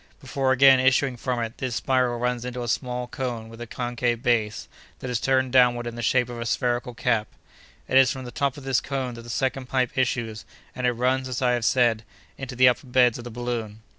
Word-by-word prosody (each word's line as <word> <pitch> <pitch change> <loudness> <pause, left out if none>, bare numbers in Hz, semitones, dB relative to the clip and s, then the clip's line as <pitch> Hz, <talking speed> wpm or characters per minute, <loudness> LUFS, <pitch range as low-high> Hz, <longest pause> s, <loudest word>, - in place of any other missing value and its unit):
Before 135 -1 -1
again 135 0 +6
issuing 130 0 +2
from 125 0 -2
it, 115 0 -5
this 130 -2 -3
spiral 125 -2 +1
runs 125 0 -1
into 125 0 -5
a - - -5
small 125 +1 -2
cone 120 -3 -5
with 115 +1 -12
a 120 - -6
concave 120 0 -2
base, 110 -4 0 0.3
that 125 - -6
is 120 - 0
turned 130 -1 +1
downward 120 -2 +4
in 120 - -5
the 120 - -6
shape 125 0 +2
of 120 -1 -7
a - - -3
spherical 120 +1 -1
cap. 115 -3 0 0.6
"It 130 - +5
is 130 -1 +5
from 130 -1 -6
the 120 - -7
top 140 +3 -1
of 145 - -10
this 135 -1 +1
cone 130 -2 -3
that 115 - -9
the 120 - -12
second 130 +1 -2
pipe 130 -2 0
issues, 120 -4 -1 0.3
and 125 -1 -1
it 125 - +2
runs, 130 +2 0
as 125 - -3
I 125 - +3
have 120 -2 0
said, 120 -3 +2 0.3
into 135 -1 -7
the 130 +1 +6
upper 125 +2 +1
beds 125 -2 +3
of 120 - -9
the - - -6
balloon. 115 -2 -5
125 Hz, 230 wpm, -24 LUFS, 120-130 Hz, 0.6 s, again